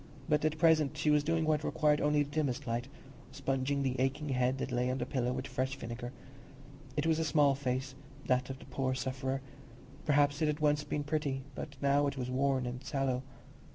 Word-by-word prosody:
But 150 -2 +2
at 155 0 +1
present 155 -2 +4
she 150 +1 +2
was 150 -1 +4
doing 165 +1 +1
what 155 -1 +2
required 150 -1 +2
only 150 0 +3
the 145 - -9
dimmest 145 -2 -1
light—sponging 135 +2 -3
the 130 -1 -1
aching 140 +3 0
head 130 0 +1
that 135 - -3
lay 125 +1 +1
on 130 - 0
the 125 - -2
pillow 125 -2 -1
with 130 +1 -3
fresh 130 0 -2
vinegar. 120 -1 -6 0.9
It 150 - +1
was 160 -1 +3
a - - +2
small 145 -2 +4
face, 130 -1 -2 0.3
that 125 0 +1
of 135 - -5
the - - -13
poor 130 -1 -1
sufferer; 130 +1 -2 0.6
perhaps 145 0 +3
it 155 - +3
had 150 0 0
once 150 -1 +2
been 145 0 -2
pretty, 145 -3 -1
but 140 +1 -7
now 140 +1 +4
it 140 - -3
was 125 -1 -3
worn 130 0 +1
and 125 +1 -5
sallow. 135 -3 0
140 Hz, 200 wpm, -32 LUFS, 130-150 Hz, 0.9 s, present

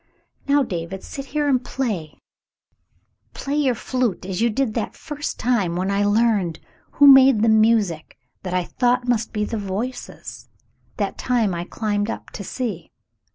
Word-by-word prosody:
"Now, 285 0 +4
David, 180 -3 -5
sit 275 - -7
here 295 +1 -1
and 260 -3 +2
play; 210 - -3 1.2
play 280 - -4
your 275 -5 +2
flute 245 -6 -2
as 190 +1 -3
you 235 - +3
did 230 0 -1
that 225 -2 -3
first 295 -2 -5
time 210 -8 0
when 185 +2 -1
I 200 +1 +1
learned 205 -5 +2 0.3
who 285 - +5
made 270 -5 +8
the 225 - +4
music 215 -7 +2 0.2
that 180 -1 -4
I 180 - +1
thought 245 +5 0
must 230 -2 0
be 210 -2 -1
the 225 +1 -3
'Voices,' 205 +6 -6 0.5
that - - -3
time 235 -6 +1
I 170 0 -4
climbed 205 +1 -2
up - - -6
to 200 - -7
see." 205 -6 -4
220 Hz, 160 wpm, -22 LUFS, 195-255 Hz, 1.2 s, made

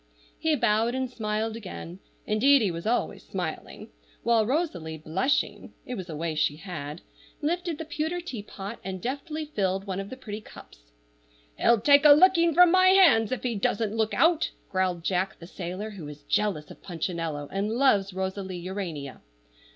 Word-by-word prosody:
He 320 -1 +2
bowed 230 -1 +2
and 260 0 -1
smiled 220 -2 -2
again 185 -4 -8 0.3
(indeed, 255 +5 +4
he 195 - +1
was 170 +4 -5
always 240 +2 0
smiling), - - -6 0.3
while 230 -2 +3
Rosalie, 195 - -2
blushing 185 - -1
(it 250 - -5
was 185 -6 -6
a 160 - -5
way 165 +1 -2
she 150 -1 +1
had), 155 -2 -7 0.4
lifted 340 +1 -1
the 320 - -6
pewter 325 +2 -2
teapot, 210 - -7
and 190 0 -5
deftly 290 - -4
filled 195 -9 -1
one 190 -1 -3
of 195 0 -5
the 260 - -8
pretty 215 -4 -7
cups. - - -14 0.8
"He'll 235 - +4
take 285 +5 +6
a 295 -1 +10
licking 340 +1 +5
from 360 -1 +7
my 370 +1 +5
hands 355 - +6
if 255 - -3
he 245 -2 0
doesn't 210 +1 -1
look 220 -1 0
out!" 330 -1 +3 0.2
growled 185 -3 0
Jack, 185 +2 -1
the 170 - -11
sailor, 185 +4 -6
who 180 -7 -8
is 150 0 -10
jealous 195 -8 -1
of - - -13
Punchinello, 165 -4 -4
and 200 +2 -1
loves 220 -6 +3
Rosalie 190 0 -4
Urania. 175 -7 -5
210 Hz, 170 wpm, -27 LUFS, 180-270 Hz, 0.8 s, a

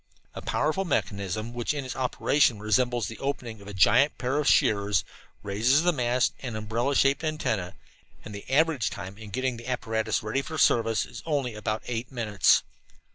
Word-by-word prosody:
A - - -7
powerful 155 +6 0
mechanism 105 - -2
which 120 +4 -2
in 140 -2 -4
its 130 - -5
operation 130 -1 +2
resembles 120 +1 +1
the 115 - -8
opening 120 -6 -4
of 100 - -13
a 105 - -7
giant 140 +9 +4
pair 130 +3 -1
of 150 - -1
shears, 100 -2 +3 0.4
raises 115 +10 +2
the 175 0 +3
mast 125 -2 +1
and 120 -5 -5
umbrella 115 +6 -1
shaped 135 +4 +3
antenna, 115 - -2 0.5
and 105 - -8
the 100 - -9
average 150 -4 +2
time 100 -1 -7
in 110 -2 -9
getting 130 +3 -2
the 120 +1 -10
apparatus 110 -4 -1
ready 110 +6 -1
for 160 +3 -6
service 115 -5 +3
is - - -10
only 140 -6 -1
about 110 0 -3
eight 120 +1 -4
minutes. 105 - +3
120 Hz, 180 wpm, -27 LUFS, 105-135 Hz, 0.5 s, giant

